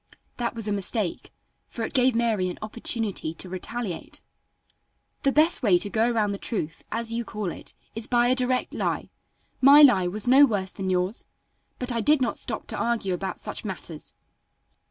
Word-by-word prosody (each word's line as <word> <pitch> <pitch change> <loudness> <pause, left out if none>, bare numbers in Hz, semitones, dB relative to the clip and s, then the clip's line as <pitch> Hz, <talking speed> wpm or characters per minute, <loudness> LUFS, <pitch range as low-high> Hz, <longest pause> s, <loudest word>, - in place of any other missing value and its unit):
That 240 -1 -2
was 225 -2 -1
a - - -1
mistake, 200 -1 -2 0.4
for 230 - -6
it - - -7
gave 255 -1 +4
Mary 220 -6 +1
an 180 - -6
opportunity 215 -6 -2
to 185 - -5
retaliate: 185 +1 -5 1.0
"The 275 - +2
best 310 +4 +4
way 200 -7 +5
to 200 +3 -1
go 225 +2 +2
around 220 -4 +1
the 200 - -4
truth, 165 -8 -4
as 230 0 -2
you 235 +1 -1
call 210 -6 -4
it, - - -8 0.2
is 225 0 -5
by 240 0 +3
a - - +5
direct 255 0 +1
lie. - - -2 0.5
My 280 +3 +9
lie 195 -10 +6
was 210 +5 -4
no 265 +3 +7
worse 200 -8 +1
than 190 -2 -4
yours. 185 +4 -1 0.5
But 250 0 -3
I 230 -1 -1
did 295 +4 +4
not 250 -3 0
stop - - -2
to - - -4
argue 230 -5 0
about 190 +2 -4
such - - -6
matters. - - -6
225 Hz, 185 wpm, -25 LUFS, 195-245 Hz, 1.0 s, My